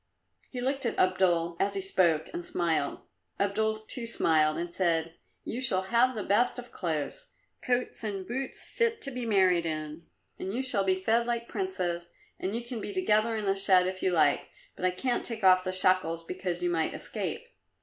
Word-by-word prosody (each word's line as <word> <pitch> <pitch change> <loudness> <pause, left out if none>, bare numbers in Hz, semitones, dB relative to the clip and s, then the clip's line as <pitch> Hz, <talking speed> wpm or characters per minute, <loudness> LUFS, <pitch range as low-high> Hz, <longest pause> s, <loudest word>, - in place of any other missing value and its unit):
He 250 - -5
looked 270 +2 -1
at - - -3
Abdul 175 -2 +2
as 200 0 +1
he 195 - -1
spoke 170 -5 +2
and 175 - -4
smiled. 165 -5 -1 0.4
Abdul 220 +2 +1
too 240 -3 -5
smiled 155 -8 +2
and 170 0 -4
said, 165 -3 +1 0.3
"You 245 - -4
shall 190 -7 +1
have 235 +5 +3
the 210 - -3
best 240 +6 +2
of 245 0 -8
clothes 165 - -3 0.3
coats 245 -1 -1
and 200 -3 -3
boots 260 +5 -2
fit 465 -2 0
to 275 - -4
be 250 -2 -4
married 185 -5 +3
in, 155 +1 -5 0.3
and 190 - -3
you 260 - -1
shall 230 -7 0
be 190 -1 +2
fed 230 +5 +2
like 235 -1 -1
princes, 175 - -3 0.3
and 195 +4 -2
you 235 - -3
can 240 -2 -6
be - - -4
together 230 - +2
in 215 -1 -2
the 195 0 +2
shed 190 -2 +4
if 185 0 -3
you - - +2
like, 155 -5 +2 0.3
but - - -3
I - - +5
can't 240 +7 -1
take 225 -3 -5
off 185 -1 +6
the 185 - -2
shackles 185 -3 +2
because 180 0 -4
you 175 - +1
might 165 -2 0
escape. 480 - -4
190 Hz, 195 wpm, -29 LUFS, 175-235 Hz, 0.4 s, off